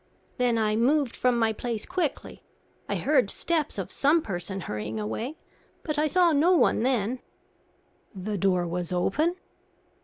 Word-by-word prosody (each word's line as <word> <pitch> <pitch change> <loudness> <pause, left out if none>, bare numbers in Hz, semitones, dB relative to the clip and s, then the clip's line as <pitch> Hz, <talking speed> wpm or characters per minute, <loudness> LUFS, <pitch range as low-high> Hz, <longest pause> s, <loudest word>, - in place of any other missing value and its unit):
Then 245 -2 +2
I 215 -1 +1
moved 265 +3 +2
from 250 -1 +2
my 225 -1 +2
place 230 -1 -3
quickly. 355 -5 -3 0.5
I - - 0
heard - - +2
steps 320 -8 -1
of 190 -1 -4
some 310 +4 +3
person 190 0 -4
hurrying 105 -5 -4
away, 225 - -4 0.5
but 305 -2 -2
I 305 - +3
saw 350 +2 +4
no 320 +5 +4
one 335 - +3
then." 245 -1 0 1.0
"The 200 +3 -4
door 180 -2 +2
was 175 0 -3
open?" 300 - +1
235 Hz, 150 wpm, -27 LUFS, 190-300 Hz, 1.0 s, saw